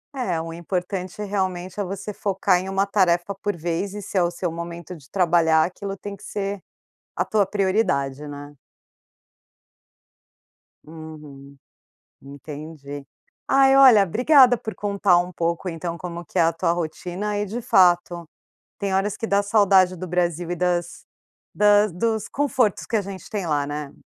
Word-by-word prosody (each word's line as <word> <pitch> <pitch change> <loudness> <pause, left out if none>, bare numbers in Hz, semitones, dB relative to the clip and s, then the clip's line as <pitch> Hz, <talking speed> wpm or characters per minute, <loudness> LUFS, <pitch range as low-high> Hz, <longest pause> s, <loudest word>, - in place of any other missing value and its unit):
É, 190 -11 -1
o 165 0 -7
importante 180 +3 -4
realmente 190 -2 -3
é - - +1
você 200 +2 -6
focar 195 -2 +1
em 190 +1 -6
uma 195 +1 +1
tarefa 190 -1 +1
por 205 +1 -3
vez, 170 +4 -3
esse 205 -1 -5
é 180 - +4
o 175 - 0
seu 175 0 -3
momento 170 +1 -7
de 145 -4 -17
trabalhar 165 -3 +3
aquilo 195 +2 -6
tem 205 +1 -7
que 195 - -18
ser 200 -1 -4 0.5
a - - 0
tua 210 -2 +2
prioridade, 185 -9 0
né. 145 0 -9 2.3
Uhum. 150 -3 -11 0.7
Entendi. 145 0 -9 0.4
Ai 270 0 +5
olha 255 -7 +8
obrigada 250 - +5
por 220 -1 -6
contar 200 -3 +2
um 180 +1 -3
pouco 170 +1 -2
então, 170 0 -5
como 170 0 -7
que - - -3
é - - +6
a 165 0 +3
tua 165 - 0
rotina 175 +5 -3
e 205 - -1
de 225 +5 -5
fato, 175 -4 +3 0.5
tem 200 -2 -2
horas 195 +2 0
que 225 - -4
dá 200 -1 +2
saudade 195 -3 +4
do 185 - -6
Brasil 175 -1 -1
e 175 - -2
das 175 -1 -2 0.5
das 205 0 +4
dos 220 +4 -1
confortos 260 -7 0
que 230 - -1
a - - +2
gente 195 -2 -8
tem 200 -4 -3
lá, 145 -3 0
né. 145 -1 -5
180 Hz, 160 wpm, -23 LUFS, 165-200 Hz, 2.3 s, olha